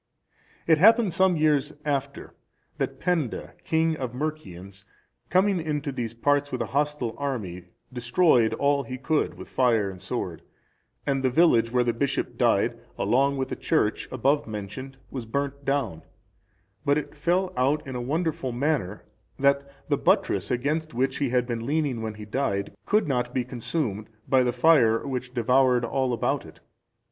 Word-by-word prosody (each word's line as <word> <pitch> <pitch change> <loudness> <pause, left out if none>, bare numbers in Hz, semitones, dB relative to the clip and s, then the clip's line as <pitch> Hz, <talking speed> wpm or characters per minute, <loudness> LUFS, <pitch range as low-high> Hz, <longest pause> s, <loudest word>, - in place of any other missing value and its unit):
It 160 -2 +4
happened 225 0 +6
some 185 +1 +3
years 150 -1 +2
after, 140 -1 -3 0.5
that - - -2
Penda, 165 -9 -1
king 160 0 +1
of 130 -3 -4
the - - -8
Mercians, 100 - -6 0.5
coming 185 0 +3
into 150 -2 -2
these 115 -3 -4
parts 145 +4 +1
with 125 - -3
a 110 - -9
hostile 145 -5 0
army, 105 -11 -4 0.3
destroyed 125 -1 +3
all 140 0 +2
he 130 0 -6
could 155 +4 0
with - - -10
fire 115 -6 +2
and 95 -1 -12
sword, 95 -5 -4 0.6
and 135 -2 0
the 130 - +2
village 120 -6 +4
where 125 0 +3
the 120 -1 0
bishop 135 +4 -2
died, - - +2 0.2
along 140 +2 +2
with 130 0 -2
the - - -3
church 130 -10 0
above 140 +3 +1
mentioned, 110 +6 -7
was 125 -4 -5
burnt 140 +3 -3
down; 135 - -1 0.8
but 145 +1 +3
it 150 - -4
fell 180 +5 0
out 140 +4 +1
in 130 -2 -6
a 125 - -3
wonderful 150 0 -1
manner 120 - -1 0.3
that 140 0 +2 0.2
the 145 -2 +1
buttress 185 - +1
against 145 +4 -1
which 130 +2 0
he 140 -3 0
had 125 0 +1
been 120 -2 -3
leaning 140 -3 -1
when 110 -1 -4
he 105 0 -9
died, 105 -4 -2
could 210 -5 +2
not 125 -3 -1
be 125 -2 0
consumed 120 -4 -3 0.2
by 130 -1 +4
the 125 -1 +2
fire 125 -4 +4
which 125 -2 -4
devoured 125 0 +3
all 130 +2 0
about 120 - 0
it. - - -14
135 Hz, 165 wpm, -26 LUFS, 120-150 Hz, 0.8 s, happened